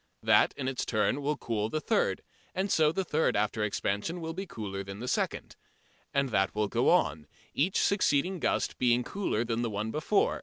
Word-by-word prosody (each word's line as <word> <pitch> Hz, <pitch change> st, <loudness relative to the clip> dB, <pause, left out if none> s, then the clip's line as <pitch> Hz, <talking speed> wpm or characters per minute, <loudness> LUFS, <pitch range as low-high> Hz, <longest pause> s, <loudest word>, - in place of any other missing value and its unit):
That -, -, +4 dB
in 130 Hz, -, -3 dB
its 135 Hz, -1 st, -2 dB
turn 110 Hz, +5 st, 0 dB
will 145 Hz, +1 st, -1 dB
cool 110 Hz, -2 st, -2 dB
the 155 Hz, -, -1 dB
third, -, -, 0 dB, 0.3 s
and 190 Hz, +1 st, -1 dB
so 155 Hz, -1 st, +4 dB
the 190 Hz, +4 st, -1 dB
third 160 Hz, 0 st, +1 dB
after 105 Hz, +1 st, 0 dB
expansion 105 Hz, -, -2 dB
will 165 Hz, -1 st, -4 dB
be 190 Hz, +3 st, -5 dB
cooler 100 Hz, -, -5 dB
than 95 Hz, 0 st, -8 dB
the 125 Hz, -, -5 dB
second. -, -, -2 dB, 0.6 s
And 140 Hz, -1 st, +1 dB
that 95 Hz, -3 st, +1 dB
will 105 Hz, 0 st, +1 dB
go -, -, +2 dB
on, 75 Hz, +1 st, +2 dB, 0.3 s
each 175 Hz, +7 st, +1 dB
succeeding 185 Hz, -2 st, +2 dB
gust -, -, -1 dB
being 125 Hz, 0 st, +3 dB
cooler 155 Hz, -, -1 dB
than 115 Hz, 0 st, -1 dB
the 120 Hz, -, -1 dB
one 105 Hz, +1 st, -3 dB
before. 155 Hz, -, +1 dB
125 Hz, 195 wpm, -29 LUFS, 105-160 Hz, 0.6 s, That